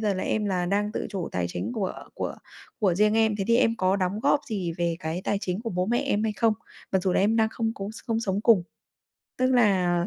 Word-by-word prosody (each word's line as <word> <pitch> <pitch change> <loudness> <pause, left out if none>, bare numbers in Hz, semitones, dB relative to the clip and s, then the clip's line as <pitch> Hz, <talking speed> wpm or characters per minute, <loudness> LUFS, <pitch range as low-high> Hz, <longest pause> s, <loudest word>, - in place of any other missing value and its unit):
giờ 210 -3 +1
là 185 - -3
em 215 - 0
là 180 -3 0
đang 205 +3 0
tự - - -3
chủ 185 -4 -3
tài 90 -1 0
chính 160 - -4
của 205 -6 -2 0.2
của - - -3 0.5
của 195 -5 +3
riêng 210 +3 +3
em, 220 -1 +3
thế 195 - 0
thì 235 - +5
em 230 -2 +3
có 190 -1 +2
đóng 195 +2 -1
góp 285 +2 +3
gì 190 -7 -2
về 170 -1 0
cái 160 +2 -3
tài 205 - 0
chính 180 +1 -2
của 230 - -3
bố 180 0 -1
mẹ 240 +3 +1
em 270 -6 0
hay 220 -1 0
không? 225 +1 +2 0.4
Mặc 190 - +4
dù 185 -1 +1
là - - +2
em 215 +3 +3
đang 220 -1 +3
không 225 0 -2
có 195 - -5
s - - -9
không 225 -1 0
sống 195 -2 -1
cùng, 225 -7 +5 0.8
tức 255 - +3
là, 205 -7 +4
ờ, 175 0 +1
205 Hz, 270 wpm, -26 LUFS, 185-225 Hz, 0.8 s, thì